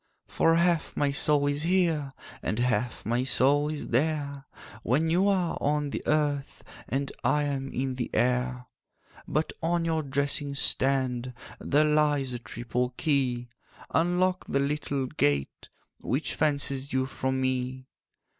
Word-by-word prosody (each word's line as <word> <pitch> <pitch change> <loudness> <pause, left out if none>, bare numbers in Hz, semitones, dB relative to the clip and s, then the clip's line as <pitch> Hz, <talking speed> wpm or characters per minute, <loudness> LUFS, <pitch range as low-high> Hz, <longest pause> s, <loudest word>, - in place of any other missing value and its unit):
'For 165 0 +2
half 170 -1 +1
my 145 -1 +2
soul 145 0 +3
is 145 0 0
here, 165 -5 +1 0.3
And 110 - -2
half 120 -1 -1
my 120 +3 +1
soul 145 +3 +3
is 155 -1 -4
there, 140 +1 -1 0.4
When 150 +9 +1
you 185 +4 +3
are 185 -4 +1
on 145 0 0
the - - -3
earth 145 -2 0 0.3
And 135 +3 -1
I 150 0 +2
am 135 -2 -3
in 130 +1 -2
the 125 -1 -3
air. 125 0 0 0.6
'But 155 +2 -1
on 170 0 0
your 160 -1 0
dressing 140 0 0
stand 130 -2 +1 0.2
There 150 +2 +2
lies 150 -3 +2
a 120 - -4
triple 125 +1 -3
key; 130 -6 0 0.4
Unlock 180 +2 +1
the 140 - 0
little 140 -1 -1
gate 70 - -1 0.3
Which 135 +5 -1
fences 140 -2 -1
you 130 0 +1
from 130 0 -2
me. 130 0 -2
140 Hz, 140 wpm, -27 LUFS, 130-150 Hz, 0.6 s, soul